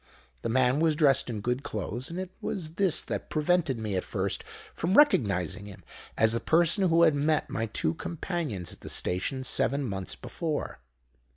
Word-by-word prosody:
The - - -3
man 130 +3 +2
was 160 -1 +3
dressed 140 -5 +3
in 110 -3 -4
good 125 +4 -1
clothes; 110 +1 -4
and 170 +2 -5
it 185 -1 -5
was 160 -4 -4
this 185 -1 +2
that - - -5
prevented 155 -3 +1
me 110 -3 -3
at 90 - -1
first - - -2 0.3
from 180 +4 -1
recognising 100 - +3
him 100 - -12 0.3
as 110 0 +4
the 115 - 0
person 175 - +3
who 165 +1 +4
had 160 -2 +5
met 150 +1 0
my 115 0 -2
two 110 - 0
companions 160 - -4
at - - -15
the - - -8
station 115 +9 0
seven 140 +2 +2
months 95 -3 -4
before. 160 -4 -4
140 Hz, 180 wpm, -28 LUFS, 110-165 Hz, 0.3 s, had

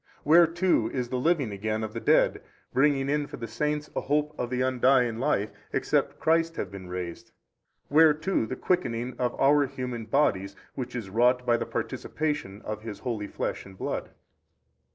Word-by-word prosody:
where 165 +3 +7
too 170 -9 +1
is 125 -2 -2
the 125 - -1
living 145 -5 +1
again 110 +2 -2
of 110 -1 -5
the 115 - -3
dead, - - +3 0.3
bringing 135 0 +3
in 145 +1 0
for - - -8
the 115 - -5
saints 150 +6 -2
a - - 0
hope 150 +1 0
of 125 - -3
the 125 0 -2
undying 125 -2 +3
life, 125 -6 0 0.2
except - - 0
Christ 165 +1 +2
have 100 - -4
been 95 -2 -9
raised? 90 -2 -6 0.6
where 155 +2 +6
too 160 -7 -1
the 130 - -4
quickening 125 -10 -1
of 125 -1 -1
our 145 +1 +4
human 125 -4 -5
bodies, 100 -7 +1 0.2
which 125 -1 -5
is 105 -6 -5
wrought 125 +3 +3
by 120 -1 +4
the - - -2
participation 145 -10 -3
of 110 0 -5
His 110 -2 -7
holy 110 -4 -3
Flesh - - -3
and 95 -1 -14
Blood? - - -3
125 Hz, 180 wpm, -27 LUFS, 110-150 Hz, 0.6 s, where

